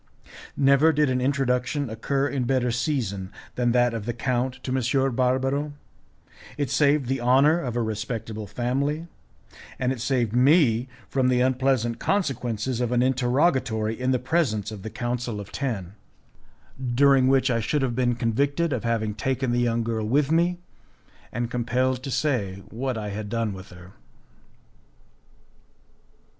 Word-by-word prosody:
Never 140 +3 +5
did 150 -3 +2
an 125 0 0
introduction 135 +1 0
occur 135 +5 -1
in 135 -3 -2
better 125 -1 +1
season 115 -7 -2 0.2
than 120 -1 +1
that 120 -1 +3
of 110 -1 -5
the 120 - -2
count 125 +1 -1
to 130 - -2
M. 130 0 +1
Barbaro. 135 +3 0 0.8
It 145 -4 -2
saved 140 0 +3
the 130 +1 -2
honour 135 +7 +4
of 125 -7 -4
a 120 - +1
respectable 110 0 -4
family; 140 - -1 0.7
and 125 0 0
it 130 -4 -4
saved 120 -4 0
me 125 -2 +4 0.2
from 130 -2 +1
the 125 -1 +3
unpleasant 130 -2 +1
consequences 125 - -1
of 120 -1 -1
an 125 0 +3
interrogatory 125 -3 +1
in 125 +2 -2
the 130 - +3
presence 125 - 0
of 105 -3 -8
the 110 - -6
Council 120 -2 -3
of 100 - -9
Ten, 105 -10 -3 1.0
during 135 -1 +5
which 130 -1 +3
I 115 - +1
should 135 +6 0
have 120 -3 -1
been 125 -1 +1
convicted 140 +7 0
of 125 - -2
having 115 -2 0
taken 130 +4 -1
the 120 - +1
young 115 -1 +1
girl 110 -2 -2
with 140 +5 +2
me, 170 +2 +2 0.7
and 120 0 -3
compelled 125 +1 0
to 135 - -6
say 120 -8 -1
what 125 +2 -3
I 105 -1 -4
had 105 +1 -5
done 115 -2 -1
with 95 0 -10
her. 90 +1 -13
125 Hz, 155 wpm, -25 LUFS, 115-135 Hz, 1.0 s, Never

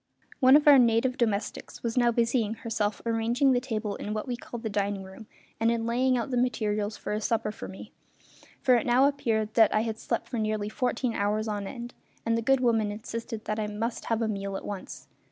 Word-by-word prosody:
One 260 0 +7
of 295 0 +4
our 285 -2 +9
native 240 +1 +3
domestics 220 -4 -2
was 230 -1 -2
now 240 -2 +4
busying 230 -1 +1
herself 215 -3 -2
arranging 230 +4 +2
the 250 - +3
table 220 -5 -3
in 210 +1 -4
what 215 - -3
we 245 - -2
called 240 -1 -8
the - - -1
"dining 200 -1 -1
room", 190 +3 -12 0.3
and 225 - +3
in 230 -1 0
laying 250 +2 +2
out 240 +3 -3
the 245 -1 +2
materials 215 -4 -1
for - - -4
a 210 - -2
supper 220 -1 0
for - - -8
me 190 +3 -10 0.7
for 255 - +5
it 245 +1 +2
now 250 +3 +5
appeared 220 -6 -1
that 225 -2 +5
I 215 - +3
had 220 -1 -3
slept - - -2
for 235 - -3
nearly 215 -1 -1
fourteen 250 +1 -1
hours 210 +2 0
on 205 -2 -3
end, 240 +1 -7 0.3
and 230 0 +2
the 230 - 0
good 270 +3 +3
woman 225 -4 +2
insisted 225 +1 -6
that 215 0 -2
I 210 - -1
must 220 +3 -3
have 225 0 0
a - - 0
meal 200 -2 -3
at - - -9
once. 200 -2 -7
225 Hz, 225 wpm, -28 LUFS, 210-240 Hz, 0.7 s, our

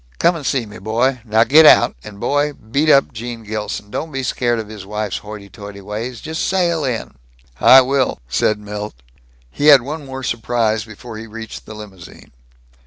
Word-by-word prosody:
Come 170 +1 +3
and 160 - -7
see 130 -3 0
me, 105 -2 -11
boy. 120 +6 0
Now 110 -1 +3
get 150 +6 +6
out, - - +6
and, 100 -1 -11
boy, 145 +5 0
beat 140 +6 -1
up 140 -3 +4
Gene 115 +1 -7
Gilson. 105 -1 -5
Don't 160 +7 -4
be 135 -1 -3
scared 120 -1 0
of 110 -2 -5
his 105 -3 -9
wife's 105 0 -4
hoity 105 -1 -10
toity 100 +1 -10
ways. 110 +4 -6
Just 160 +1 -3
sail 175 -4 +1
in." 125 -4 -3 0.5
"I 130 - +8
will," 130 -6 0
said 105 - +1
Milt. 105 - -7 0.6
He 145 - 0
had 140 -5 +8
one 150 +3 -6
more 135 -1 -7
surprise 115 -2 -1
before 110 +1 -10
he 115 - -9
reached 110 0 -9
the 110 - -9
limousine. 100 -5 -12
115 Hz, 185 wpm, -18 LUFS, 105-135 Hz, 0.6 s, I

